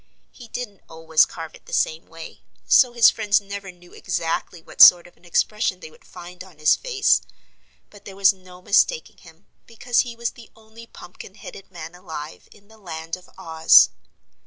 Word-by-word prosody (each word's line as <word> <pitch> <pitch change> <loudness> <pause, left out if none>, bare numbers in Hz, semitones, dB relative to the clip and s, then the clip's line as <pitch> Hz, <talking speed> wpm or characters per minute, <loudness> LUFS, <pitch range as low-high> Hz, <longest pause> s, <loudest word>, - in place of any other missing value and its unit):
He 245 - -14
didn't 225 -5 -8
always 160 0 +1
carve 160 -2 -10
it - - -19
the - - -12
same 160 +1 -1
way, 165 0 -12 0.2
so 250 -2 +4
his 235 -1 +5
friends 215 0 +1
never 200 -1 -9
knew 175 0 -21
exactly 165 +1 -4
what 160 - -5
sort 175 -1 +9
of 175 - -18
an - - -26
expression 190 +2 -1
they 160 - -12
would - - -23
find 180 +1 -12
on 185 -4 -18
his 155 0 +3
face. 470 -5 +1 0.7
But 205 - -18
there 195 - -11
was 195 0 +4
no 180 -1 -17
mistaking 475 - +1
him, - - -19 0.2
because 235 +1 -2
he 240 -2 -1
was 235 0 -4
the 235 - -16
only 220 +1 -16
pumpkin 180 0 -14
headed 200 -2 -12
man 170 -2 -10
alive 160 -4 -10
in 205 -1 -21
the 220 0 -20
Land 165 -4 -7
of 185 0 -19
Oz. 160 0 +4
185 Hz, 185 wpm, -21 LUFS, 165-220 Hz, 0.7 s, sort